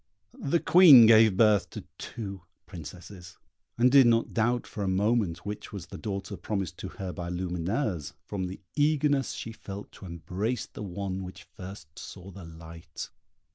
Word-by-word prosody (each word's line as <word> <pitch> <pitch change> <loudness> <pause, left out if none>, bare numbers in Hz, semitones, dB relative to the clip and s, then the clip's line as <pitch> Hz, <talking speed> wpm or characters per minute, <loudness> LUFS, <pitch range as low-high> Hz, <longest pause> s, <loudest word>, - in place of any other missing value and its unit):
The 165 +5 0
Queen 160 -11 +8
gave 110 -3 +6
birth 105 -4 +4
to - - -8 0.2
two 100 -5 -7 0.2
princesses, 90 0 -11 0.4
and 125 +2 +4
did 135 -2 +7
not 115 0 +2
doubt 120 +2 +1
for 105 - -6
a - - -1
moment 100 -1 0
which 105 0 -6
was 100 -4 -7
the - - -10
daughter 100 -1 -5
promised 95 -4 -4
to - - -5
her 95 -1 -6
by 85 -2 -5
Lumineuse, 90 - -2
from 95 -3 -4
the 95 - -9
eagerness 145 -4 +2
she 105 +1 -6
felt 100 -2 -9
to 95 - -11
embrace 95 +8 -3
the - - -11
one 95 -1 -4
which 90 0 -10
first 90 -5 -10
saw 95 0 -10
the 95 -2 -11
light. 80 0 -10
100 Hz, 165 wpm, -28 LUFS, 90-115 Hz, 0.4 s, Queen